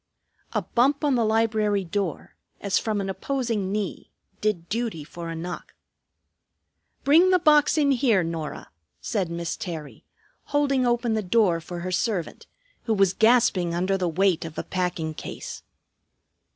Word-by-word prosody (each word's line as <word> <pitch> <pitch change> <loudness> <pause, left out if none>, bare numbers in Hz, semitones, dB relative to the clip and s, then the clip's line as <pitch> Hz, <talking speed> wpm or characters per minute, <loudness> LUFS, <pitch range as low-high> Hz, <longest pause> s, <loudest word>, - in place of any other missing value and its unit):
A - - 0
bump 275 +5 +2
on 290 -2 +3
the 240 -2 +2
library 215 -2 +1
door, 185 -2 -3 0.2
as 200 -2 +1
from 215 -2 -1
an 195 - -3
opposing 215 0 -2
knee, 205 -3 -3 0.3
did 200 -6 -1
duty 225 -7 -2
for 170 +2 -8
a 165 - -4
knock. 175 +2 -7 1.3
"Bring 330 +6 +6
the 370 - +5
box 305 -3 +4
in 285 -2 +3
here, 235 -8 +3
Norah," 165 -2 -5 0.3
said 195 -7 -2
Miss 170 0 -3
Terry, 160 -6 -7 0.4
holding 275 -3 +1
open 240 -1 +1
the 220 - +1
door 185 -4 +2
for 175 +1 -7
her 185 +1 -4
servant, 185 -2 -2 0.4
who 225 -2 +1
was 195 -2 +3
gasping 220 -7 +3
under 185 +3 +1
the 180 -2 0
weight 180 +1 +2
of 165 -1 -8
a - - -2
packing 175 -4 -2
case. - - -7
200 Hz, 150 wpm, -25 LUFS, 175-235 Hz, 1.3 s, Bring